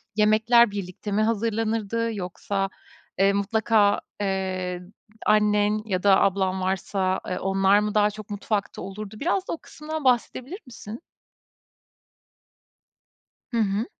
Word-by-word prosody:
yemekler 220 +2 +5
birlikte 200 +1 -6
mi 210 - +2
hazırlanırdı 225 0 0
yoksa, 195 +1 -3 0.5
eee, 195 +1 +4
mutlaka, 205 0 +2 0.2
eee, 185 -2 -2 0.4
annen 210 0 +3
ya 185 -4 -2
da 195 -1 +5
ablan 190 -1 +1
varsa, 190 0 -1
eee, 180 - -2
onlar 195 +1 +3
mı 210 0 -2
daha 210 0 +4
çok 215 0 -10
mutfakta 205 0 -3
olurdu? 195 +2 -7
Biraz 365 +4 0
da - - -2
o - - -4
kısımdan 310 0 -7
bahsedebilir 255 - 0
misin? 230 0 -9 2.5
Hı 235 - -1
hı. 210 0 +1
210 Hz, 120 wpm, -25 LUFS, 195-225 Hz, 2.5 s, yemekler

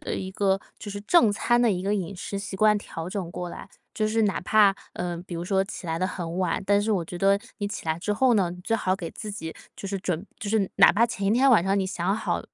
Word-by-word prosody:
的 - - -4
一 190 0 -4
个 195 0 +1 0.2
就 205 - -7
是 205 - -5
正 230 -2 +5
餐 240 +3 +2
的 235 -3 +4
一 180 -1 -1
个 200 +2 0
饮 190 -1 -3
食 200 +2 -5
习 195 -1 -6
惯 210 0 +4
调 165 -3 -7
整 185 -4 -4
过 180 0 -5
来。 - - -9 0.3
就 215 -1 0
是 225 +1 +1
哪 200 -2 +1
怕， 200 +1 +4 0.2
呃， 175 -1 -3
比 175 - -6
如 170 +1 -4
说 190 +1 +2
起 195 - -8
来 165 0 -1
得 185 - +1
很 175 -2 -5
晚， 180 -1 0
但 205 +1 +3
是 215 +1 0
我 175 -4 0
觉 175 +1 -7
得 195 +1 +4 0.2
你 205 - -2
起 205 - -6
来 160 +1 -1
之 210 +4 -1
后 255 +3 +3
呢， 190 -4 +2
你 180 - -8
最 225 - 0
好 185 -3 0
给 175 -4 -6
自 215 -2 -7
己 160 -5 -6 0.2
就 195 - -7
是 195 -1 -2
准 180 0 -2
就 205 - -5
是 210 -3 +1
哪 195 - +8
怕 225 +4 +4
前 200 -4 -3
一 - - +3
天 265 +3 +5
晚 220 -9 +6
上 195 +1 +2
你 195 - +1
想 185 +1 -1
好 220 - -1
195 Hz, 300 characters per minute, -26 LUFS, 180-210 Hz, 0.3 s, 哪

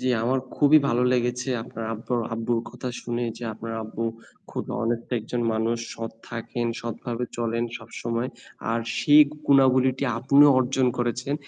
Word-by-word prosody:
জ্বি, 130 - 0 0.2
আমার 130 +2 +1 0.2
খুবই 150 +1 +7
ভালো 120 +1 +2
লেগেছে 125 +1 0
আপনার 115 -1 -7
আব্বর 115 +2 -2 0.2
আব্বুর 115 +1 0
কথা 125 - -6
শুনে 120 0 -2
যে 120 - -6
আপনার 115 +1 -6
আব্বু 110 +1 -4 0.5
খুব - - -4
honest 115 -1 -1
একজন 120 +2 -4
মানুষ। 115 +1 0 0.2
সৎ 115 0 -5 0.2
থাকেন, 120 0 -3
সৎভাবে 120 +1 -4
চলেন 115 0 -1
সবসময়। 115 +2 -4 0.4
আর 115 0 +1 0.2
সেই 150 +1 +7 0.2
গুণাবলিটি 130 -1 +4
আপনিও 140 +4 +6
অর্জন 130 0 +2
করেছেন। 125 +3 -1
120 Hz, 145 wpm, -25 LUFS, 115-130 Hz, 0.5 s, খুবই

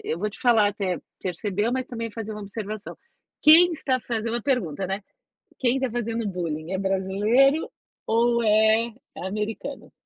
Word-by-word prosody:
eu 160 - -2
vou 210 +2 -2
te - - -13
falar 225 -4 +5
até 190 -3 -2 0.2
percebeu, 200 +4 -1
mas 255 0 -2
também 230 -2 -5
fazer 220 0 -6
uma 210 - -7
observação, 205 +1 -6 0.5
quem 335 +3 +8
está 260 -5 -1
fazendo 230 -1 -3
uma 240 - -2
pergunta, 195 - -1
né, 195 +2 -3 0.6
quem 250 0 +2
está 265 -1 -1
fazendo 230 -1 -2
bullying 165 -3 -4
é 190 - 0
brasileiro 205 +10 +2 0.4
ou 235 +1 +2
é 220 +2 +4 0.3
é - - -6
americano? 210 +3 -5
220 Hz, 160 wpm, -25 LUFS, 195-240 Hz, 0.6 s, quem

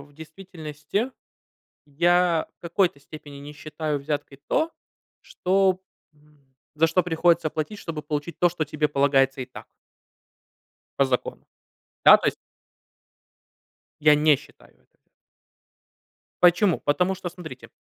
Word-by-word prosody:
в 145 +1 -16
действительности, 160 - -5 0.8
я 170 +2 +2
в - - -110
какой-то 170 -3 0
степени 145 -1 -11
не 145 +1 -10
считаю 155 0 -4
взяткой 140 -1 -5
то, 320 +1 +1 0.5
что, 190 0 +1 0.3
м, 145 -3 -29 0.2
за 160 +2 +3
что 175 +3 +2
приходится 170 -1 +2
платить, 155 +8 -4
чтобы 160 -5 -6
получить 150 +2 -4
то, 175 - +4
что 170 -2 -3
тебе 150 +1 -1
полагается 135 -1 +2
и 130 - -4
так. 130 - -12 1.3
По - - +6
закону. 130 -2 -3 0.6
Да, - - +9
то - - -2
есть - - 0 1.7
Я 150 0 +6
не 150 -1 +4
считаю - - -19
это - - -37 1.4
Почему? 175 +1 +4
Потому 180 +6 +1
что, 185 -1 -6
смотрите, 165 -7 -11
155 Hz, 125 wpm, -24 LUFS, 145-175 Hz, 1.7 s, Да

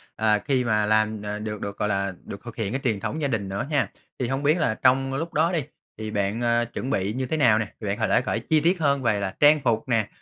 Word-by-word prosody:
ờ, 110 -1 +2
khi 130 -3 +2
mà 105 -3 +1
làm, 110 0 +1
ờ, 105 0 -4
được 105 -1 -5
được, 100 0 -5
gọi 105 - 0
là, 100 -1 -1
được 100 - -8
thực 120 -1 -8
hiện 105 -2 -2
cái 135 - -2
truyền 110 -6 0
thống 155 - -3
gia 140 - +1
đình 105 -6 -2
nữa 100 +6 -3
ha. 130 -9 +1 0.3
Thì 125 - 0
hông 135 +2 -2
biết 150 +4 +3
là 155 -10 +1
trong 135 +2 +2
lúc 165 +5 -3
đó 160 +3 +2
đi 170 - +1 0.4
thì 110 -1 -5
bạn, 105 +2 -1
a, 120 0 +2
chuẩn 120 +2 -5
bị 100 -5 0
như 130 +1 -2
thế 160 +5 -2
nào 120 -7 +4
nè? 110 -3 -4
Thì 105 - -4
bạn 100 +1 -1
h - - -3
lể 115 - +4
kể 120 -3 -1
chi 155 +7 +2
tiết 170 +4 +2
hơn 140 -3 +1
về 105 -3 +2
là 95 -1 -3
trang 150 +1 +6
phục 115 -3 +1
nè, 115 -3 +2
115 Hz, 290 wpm, -25 LUFS, 105-135 Hz, 0.4 s, trang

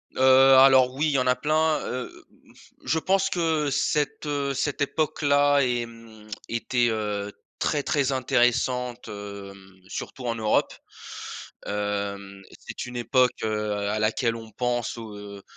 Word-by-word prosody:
Heu, - - -6 0.4
alors, 130 -1 +6
oui, 150 - 0
il - - +1
y 140 - +2
en 130 - 0
a 125 - +4
plein. 155 +3 +1
Heu 125 0 -3
heu, - - -16 0.2
m - - -21
f - - -20
je 160 - 0
pense 190 +2 +1
que, 160 -4 0
cette, 150 +2 0
heu, 140 -2 -1
cette 145 +1 -2
époque-là, 145 -1 +2
est, 120 -2 0
mmh 115 -2 -15 0.2
était 120 +1 0
heu, 105 -2 -3 0.3
très, 145 - 0
très 140 -2 +1
intéressante, 125 -1 0
hem, 100 -2 -9
surtout 125 - -7
en 115 - -1
Europe. 110 -1 +1 0.9
Hem 100 -1 -4
et - - -14
c'est - - -7
une 125 0 -7
époque, 125 +2 +3
heu, 105 -1 -1 0.2
à 105 +1 -1
laquelle 115 +2 0
on 115 -1 -10
pense 120 +1 -2
où, 110 -2 -8
heu, 100 -1 -10
125 Hz, 160 wpm, -25 LUFS, 105-140 Hz, 0.9 s, alors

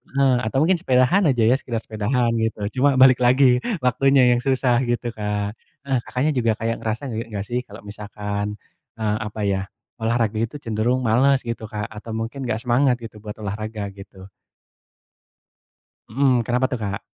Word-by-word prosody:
heeh, 135 -2 +4
atau 120 - -2
mungkin 180 +3 +3
sepedaan 130 +9 +3
aja 125 -5 +2
ya, 115 +4 +5
sekedar 115 -5 -4
sepedaan 115 +3 0
gitu, 110 -1 -2 0.2
cuma 140 +1 +4
balik 130 -1 +7
lagi 125 0 +5 0.3
waktunya 130 0 +4
yang 120 - +3
susah, 125 -1 +2
gitu, 120 0 -1
Kak. 105 -1 -3 0.2
Heeh, 135 -3 0
Kakaknya, 135 +5 0
juga 115 -5 +1
kayak 115 +1 -2
ngerasa 115 +4 -3
nggak 110 -3 -4
sih 120 +3 -2
kalau 105 +2 -12
misalkan 105 0 -5 0.4
eee, 110 -2 -1
apa 105 +1 -6
ya, 95 -1 -1 0.3
olahraga 115 -1 0
itu 115 +5 -2
cenderung 120 0 -1
males, 130 +4 +3
gitu, 115 -2 -5
Kak, 105 -1 -5
atau 110 +1 -7
mungkin 120 +4 -4
nggak 110 -1 -2
semangat 125 +1 +3
gitu, 110 -2 -9
buat 105 0 -8
olahraga, 105 0 -4
gitu? 95 -1 -13 1.8
Mhm, 130 +1 +2
kenapa 120 +3 0
tuh, 125 -2 -2
Kak? 100 -1 -3
115 Hz, 165 wpm, -22 LUFS, 105-130 Hz, 1.8 s, balik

